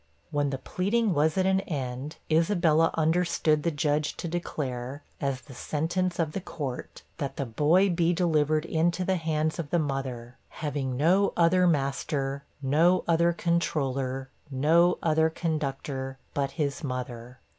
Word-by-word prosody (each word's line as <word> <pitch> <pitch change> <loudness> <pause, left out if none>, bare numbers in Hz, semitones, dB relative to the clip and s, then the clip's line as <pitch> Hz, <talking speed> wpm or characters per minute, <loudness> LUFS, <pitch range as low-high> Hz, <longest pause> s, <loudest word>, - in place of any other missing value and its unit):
When 145 -1 +1
the 135 - -2
pleading 200 - 0
was 155 +2 +2
at 185 - +3
an 190 0 +3
end, 140 -4 -4 0.2
Isabella 165 -1 +3
understood 160 -1 +2
the 170 - +1
Judge 150 -1 0
to - - -4
declare, 140 -5 -4 0.2
as 135 -2 -1
the 135 - -13
sentence 170 +7 -1
of 160 -3 0
the 195 - -4
Court, 140 -8 -6 0.2
that 140 -3 -3
the 140 - -1
'boy 150 - +3
be 170 0 +2
delivered 155 -3 +2
into 170 +3 +1
the 190 0 +1
hands 155 0 -1
of 155 -4 -4
the 175 - +2
mother 130 -5 -3
having 140 -4 -3
no 185 +8 +3
other 180 +2 +4
master, 140 -2 -1 0.2
no 165 +7 +3
other 170 0 +4
controller, 135 -6 -1 0.2
no 160 +6 +3
other 160 0 +3
conductor, 140 -5 -3 0.2
but 140 -1 0
his 145 -1 -1
mother.' 125 -2 -5
155 Hz, 145 wpm, -27 LUFS, 135-170 Hz, 0.2 s, other